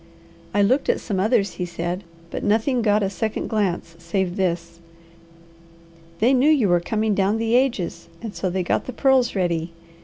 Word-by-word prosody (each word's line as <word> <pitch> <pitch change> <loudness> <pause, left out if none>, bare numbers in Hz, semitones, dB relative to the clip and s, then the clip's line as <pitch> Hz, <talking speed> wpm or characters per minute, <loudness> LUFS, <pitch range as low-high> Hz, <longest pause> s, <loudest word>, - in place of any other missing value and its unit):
"I 205 - +3
looked 260 +8 +2
at - - +2
some 200 -5 -3
others," 210 0 +2
he - - 0
said, 175 +2 -4 0.3
"but - - -4
nothing 225 +4 +2
got 210 -1 +2
a - - +1
second 215 +3 -3
glance 185 -6 -1
save 175 +2 -2
this. 170 -3 -2 1.4
They 235 +8 +3
knew 265 +3 +4
you 270 -10 +4
were 175 0 +4
coming 215 +4 0
down 200 +2 +1
the 225 0 -1
ages, 210 -11 0
and 225 -3 -6
so 185 - -2
they 185 +1 -1
got - - 0
the 255 - -5
pearls 265 -2 +3
ready. 170 -3 -1
200 Hz, 180 wpm, -23 LUFS, 175-230 Hz, 1.4 s, knew